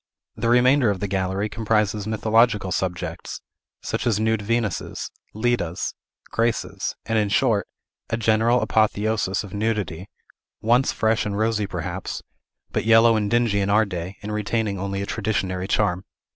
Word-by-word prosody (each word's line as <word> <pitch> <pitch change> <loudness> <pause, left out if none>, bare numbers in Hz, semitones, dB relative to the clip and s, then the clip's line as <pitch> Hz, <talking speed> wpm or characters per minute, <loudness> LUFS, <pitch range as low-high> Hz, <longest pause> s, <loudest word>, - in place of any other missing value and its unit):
The 115 - -1
remainder 125 +1 +5
of 100 -2 -1
the 100 - -2
gallery 95 +1 -1
comprises 105 -1 0
mythological 110 -2 +2
subjects, 90 -1 -3 0.4
such - - -2
as 110 -3 +2
nude 110 0 +1
Venuses, 110 -1 -2 0.2
Ledas, 110 -7 -1 0.4
Graces, 115 0 -1
and, 115 0 +1
in 105 -1 +1
short, 105 -1 +2 0.4
a 115 - 0
general 115 +2 +3
apotheosis 110 -2 +1
of 100 - -10
nudity, 100 -4 -2 0.5
once 120 +4 +3
fresh 110 0 +1
and 100 -1 -3
rosy 110 -1 +1
perhaps, - - -5 0.5
but - - -1
yellow 115 +1 +6
and 105 -2 0
dingy 120 -3 +2
in 100 0 0
our 110 +2 +4
day, 90 0 -5
and 105 +1 -4
retaining 105 -1 -1
only 100 +1 -2
a - - -3
traditionary 95 -3 -2
charm. 95 -3 +1
105 Hz, 145 wpm, -23 LUFS, 100-115 Hz, 0.5 s, yellow